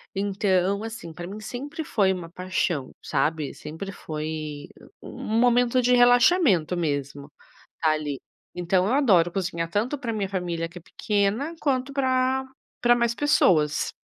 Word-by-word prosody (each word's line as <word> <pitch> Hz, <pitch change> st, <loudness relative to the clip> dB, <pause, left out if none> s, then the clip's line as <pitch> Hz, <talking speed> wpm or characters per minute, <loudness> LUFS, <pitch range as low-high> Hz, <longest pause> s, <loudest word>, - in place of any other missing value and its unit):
Então, 195 Hz, 0 st, 0 dB
assim, 220 Hz, -7 st, -7 dB
pra 175 Hz, +2 st, -8 dB
mim 205 Hz, +3 st, -7 dB
sempre 280 Hz, +8 st, -6 dB
foi 195 Hz, -8 st, +2 dB
uma 170 Hz, -2 st, -7 dB
paixão, 180 Hz, -6 st, -2 dB
sabe. 150 Hz, +1 st, -1 dB
Sempre 160 Hz, +6 st, -7 dB
foi 155 Hz, -3 st, -5 dB, 0.3 s
u -, -, -10 dB
um 220 Hz, +1 st, -2 dB
momento 245 Hz, +1 st, +3 dB
de 250 Hz, +1 st, +3 dB
relaxamento 245 Hz, -, +4 dB
mesmo, 145 Hz, -2 st, -3 dB, 0.5 s
ali. 155 Hz, -3 st, 0 dB, 0.4 s
Então 180 Hz, +2 st, +1 dB
eu 245 Hz, -, +1 dB
adoro 190 Hz, -12 st, +4 dB
cozinhar 170 Hz, -3 st, -2 dB
tanto 230 Hz, -, -1 dB
pra 235 Hz, -3 st, -3 dB
minha 205 Hz, -3 st, -2 dB
família 175 Hz, -3 st, -3 dB
que 180 Hz, +2 st, -11 dB
é -, -, -20 dB
pequena, 210 Hz, -, -1 dB
quanto 270 Hz, -1 st, 0 dB
pra 260 Hz, -1 st, +1 dB, 0.4 s
pra 240 Hz, 0 st, +5 dB
mais 235 Hz, -1 st, +1 dB
pessoas. 160 Hz, -, +2 dB
195 Hz, 145 wpm, -25 LUFS, 165-245 Hz, 0.5 s, pra